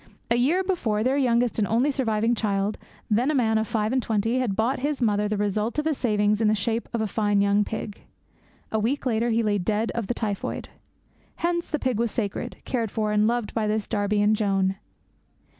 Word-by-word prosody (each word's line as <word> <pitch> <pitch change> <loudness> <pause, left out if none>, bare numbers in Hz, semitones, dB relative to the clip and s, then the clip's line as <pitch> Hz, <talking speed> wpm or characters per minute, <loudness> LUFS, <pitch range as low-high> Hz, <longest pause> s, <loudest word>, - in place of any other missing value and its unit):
A - - +5
year 295 +10 +2
before, 230 - 0
their 260 +3 +2
youngest 245 -4 +2
and 205 - +2
only 245 +6 +2
surviving 230 -3 +1
child, 205 -2 -1 0.3
then 235 +6 +2
a 305 - +1
man 220 -4 +2
of 220 - -2
five 215 +2 0
and 260 - +2
twenty, 225 +2 0
had 235 -7 0
brought 235 +6 0
his 290 +1 -1
mother 210 -3 +1
the 210 0 -1
result 210 +4 -1
of 300 - 0
his 315 -2 +1
savings 210 -2 +2
in 220 - +3
the 215 - +3
shape 225 +2 -2
of 235 - -1
a - - +1
fine 205 -1 +1
young 200 +1 +3
pig. 215 -1 -6 0.7
A 220 - +1
week 250 +7 -1
later 235 -1 +1
he 230 0 +2
lay 205 -1 +1
dead 215 +5 0
of 230 -4 -3
the 245 - -1
typhoid. 205 -3 -3 0.7
Hence 345 0 -1
the 305 - 0
pig 255 -5 -1
was 235 0 +1
sacred, 225 +2 -3
cared 230 -4 -1
for, 215 0 -1
and 210 0 +3
loved 235 -2 -1
by 220 -2 0
this 215 0 0
Darby 205 -1 0
and 210 +1 +4
Joan. 195 -2 +1
220 Hz, 215 wpm, -25 LUFS, 210-245 Hz, 0.7 s, A